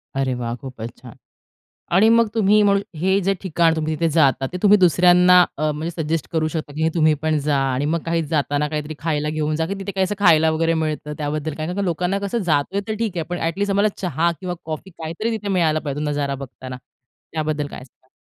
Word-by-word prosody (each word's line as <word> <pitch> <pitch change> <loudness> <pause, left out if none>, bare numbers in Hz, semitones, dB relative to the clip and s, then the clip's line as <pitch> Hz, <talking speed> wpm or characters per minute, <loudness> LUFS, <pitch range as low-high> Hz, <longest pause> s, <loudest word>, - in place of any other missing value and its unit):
अरे 135 -1 0
वाह! 120 -1 -3
खूपच 125 -3 -8
छान! 120 -3 -13 0.8
आणि 205 +4 +6
मग 230 0 +4
तुम्ही 210 -1 +4
म्हणू 200 -1 +4 0.2
हे 190 +3 +2
जे 195 +1 +1
ठिकाण 165 -3 +2
तुम्ही 155 0 -1
तिथे 165 +2 0
जाता 140 -4 +3
ते - - -2
तुम्ही 205 0 +7
दुसऱ्यांना 180 0 +6 0.2
अ, 155 +1 0
म्हणजे 155 +3 -4
सजेस्ट 160 -1 -2
करू 160 -1 0
शकता 155 -2 -5
की 155 +2 -2
हे 160 - +3
तुम्ही 155 -2 +4
पण 155 -1 +1
जा 145 0 0 0.2
आणि 135 +3 -1
मग 165 +3 0
काही 165 0 0
जाताना 145 -1 0
काहीतरी 150 0 -4
खायला 150 -2 -1
घेऊन 155 0 -1
जा, 160 +1 0
की 190 - -3
तिथे 195 +1 -5
काही 190 0 0
असं 205 +2 -2
खायला 160 -5 +5
वगैरे 165 +1 +1
मिळतं 155 -2 -2
त्याबद्दल 150 +1 -3
काय 155 0 -3
कारण 190 +3 -2
लोकांना 180 +3 -1
कसं 200 +3 -2
जातोय 160 +5 +1
तर 220 - -1
ठीक 215 -6 -2
आहे. 165 - -1
पण 175 0 -3
अट 165 +1 -2
लिस्ट 200 0 0
आम्हाला 200 +2 +3
चहा 170 -2 0
किंवा 180 -2 -4
कॉफी 160 +4 -6
काहीतरी 170 +6 -4
तिथे 210 -1 -8
मिळायला 165 -5 +2
पाहिजे 145 -1 -4
नजारा 145 -1 -1
बघताना 130 -1 -8 0.6
त्याबद्दल 155 -2 -2
काय 145 - -9
सांगाल? 130 0 -23
160 Hz, 220 wpm, -21 LUFS, 150-180 Hz, 0.8 s, तुम्ही